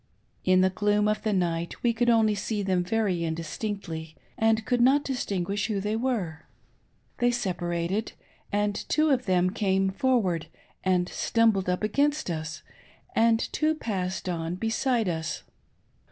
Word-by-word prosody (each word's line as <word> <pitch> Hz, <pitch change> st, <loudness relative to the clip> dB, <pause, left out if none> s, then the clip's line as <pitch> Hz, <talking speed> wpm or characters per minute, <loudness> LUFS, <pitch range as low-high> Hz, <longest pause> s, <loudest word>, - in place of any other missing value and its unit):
In 185 Hz, 0 st, +4 dB
the 190 Hz, 0 st, +3 dB
gloom 205 Hz, +2 st, +2 dB
of 215 Hz, 0 st, 0 dB
the 215 Hz, -, 0 dB
night 170 Hz, -3 st, -1 dB
we 235 Hz, -1 st, +3 dB
could 240 Hz, +1 st, +1 dB
only 220 Hz, -2 st, +4 dB
see 205 Hz, +1 st, -2 dB
them 185 Hz, -2 st, +1 dB
very 190 Hz, -3 st, 0 dB
indistinctly, 165 Hz, 0 st, -4 dB, 0.2 s
and 220 Hz, 0 st, +2 dB
could 245 Hz, -1 st, +1 dB
hot 280 Hz, +3 st, +5 dB
distinguish 205 Hz, -6 st, -2 dB
who 210 Hz, -3 st, -1 dB
thej^ 210 Hz, +3 st, -1 dB
were. 185 Hz, -12 st, -2 dB, 0.7 s
They 245 Hz, -, +4 dB
separated; 180 Hz, -3 st, -2 dB, 0.4 s
and 205 Hz, 0 st, +1 dB, 0.2 s
two 310 Hz, 0 st, +3 dB
of 255 Hz, -5 st, +1 dB
them 185 Hz, -1 st, +3 dB
came 195 Hz, -1 st, +1 dB
forward 190 Hz, -, +1 dB, 0.4 s
and 180 Hz, -1 st, +2 dB
stumbled 220 Hz, -5 st, +2 dB
up 180 Hz, +3 st, -1 dB
against 285 Hz, -, +1 dB
us, 160 Hz, -1 st, -5 dB, 0.5 s
and 225 Hz, 0 st, +4 dB, 0.2 s
two 315 Hz, 0 st, +2 dB
passed 190 Hz, -9 st, -3 dB
on 170 Hz, -1 st, -2 dB
beside 225 Hz, +2 st, 0 dB
us. 160 Hz, -2 st, -3 dB
205 Hz, 145 wpm, -27 LUFS, 180-225 Hz, 0.7 s, hot